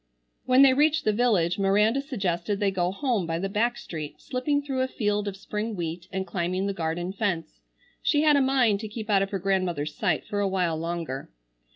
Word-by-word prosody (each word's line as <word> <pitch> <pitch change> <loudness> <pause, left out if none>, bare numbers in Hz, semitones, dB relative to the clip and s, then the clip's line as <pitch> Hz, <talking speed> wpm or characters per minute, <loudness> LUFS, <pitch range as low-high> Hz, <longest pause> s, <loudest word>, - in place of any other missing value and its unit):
When 255 +2 +6
they 270 -1 +7
reached 300 +3 +2
the 215 - +3
village 205 -7 +2
Miranda 210 +6 +3
suggested 195 - -2
they 200 -2 +2
go 180 -1 0
home 225 - -1
by 165 0 -1
the 190 +3 -2
back 235 +4 0
street, 155 -10 -7
slipping 285 +3 -1
through 270 -2 -2
a 260 - +1
field 210 -4 -1
of 195 -1 -4
spring 210 +2 -4
wheat 170 0 -4
and 190 -1 -2
climbing 185 0 -2
the 200 - -1
garden 175 +1 -3
fence. 180 -6 -2 0.4
She 295 -1 +2
had 300 -1 +5
a 280 - +4
mind 255 -6 +3
to 215 - -5
keep 215 0 -5
out 195 -1 +4
of 195 - -1
her 200 - -2
grandmother's 180 -6 -1
sight - - 0
for 205 - -3
a 200 - +2
while 180 -4 0
longer. 165 -5 -4
200 Hz, 210 wpm, -26 LUFS, 175-240 Hz, 0.4 s, they